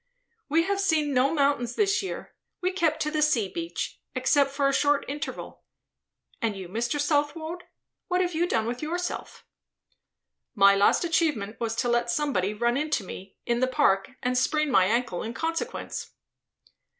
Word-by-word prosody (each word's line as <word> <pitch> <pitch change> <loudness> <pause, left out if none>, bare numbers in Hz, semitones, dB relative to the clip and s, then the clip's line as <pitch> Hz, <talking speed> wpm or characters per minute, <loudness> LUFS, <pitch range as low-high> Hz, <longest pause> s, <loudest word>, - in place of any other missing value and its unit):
"We 325 +3 +3
have 395 +2 -1
seen 310 -6 +1
no 260 +2 +3
mountains 280 -6 +1
this 415 0 +2
year; 385 - -6 0.3
we 365 0 0
kept 325 -4 0
to 300 - -2
the 305 -1 0
sea 260 -9 +3
beach. 170 -2 -5
Except 270 +2 +3
for 275 0 +1
a 275 - +1
short 290 +1 +2
interval. 290 +2 -6 0.8
And 220 -3 0
you, 190 -2 -7
Mr. 235 +9 -2
Southwode? 310 +4 -1 0.4
What 360 0 +1
have 360 -1 0
you 340 +2 +1
done 220 -9 0
with 240 +2 -3
yourself?" 350 +3 -4 1.1
"My 200 -1 +7
last 200 - +4
achievement 295 -11 0
was 225 -1 -2
to 245 - 0
let 240 0 +1
somebody 235 -8 0
run 235 +3 0
into 300 -6 0
me, 190 +1 -9
in 235 0 +1
the 255 - +2
Park, 195 -6 +2
and 250 +1 0
sprain 305 +3 +1
my 190 -7 +5
ankle 230 -2 0
in 230 +1 -5
consequence." 330 +9 -3
280 Hz, 165 wpm, -26 LUFS, 230-315 Hz, 1.1 s, My